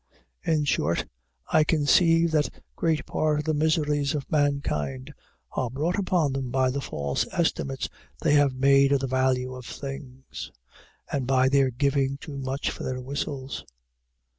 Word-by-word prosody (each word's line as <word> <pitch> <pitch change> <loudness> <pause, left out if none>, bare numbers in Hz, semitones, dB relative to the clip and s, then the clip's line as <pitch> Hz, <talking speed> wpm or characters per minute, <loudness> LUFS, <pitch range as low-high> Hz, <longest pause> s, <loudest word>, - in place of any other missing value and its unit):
In 155 -2 +1
short, 85 - +1 0.5
I 155 - +6
conceive 165 +2 +4
that 150 -2 +2 0.3
great 160 -3 0
part 155 -1 0
of 150 - -2
the 160 - +1
miseries 150 -1 +1
of 140 -3 -5
mankind 75 - 0 0.4
are 125 - -1
brought 155 - -1
upon 175 -7 +1
them 135 -2 -3
by 130 0 +2
the 140 +2 -2
false 70 - -2
estimates 70 -1 -1 0.3
they 145 - +2
have 145 -3 +4
made 135 +1 +5
of 140 - +3
the - - 0
value 130 0 +1
of 125 -2 -9
things, 135 0 -7 0.6
and 135 -3 -1
by 130 0 +4
their 135 -1 +4
giving 140 +2 +1
too 140 -1 -8
much 135 +1 -2
for - - -8
their 130 0 -3
whistles. 135 0 -4
140 Hz, 155 wpm, -26 LUFS, 130-150 Hz, 0.6 s, I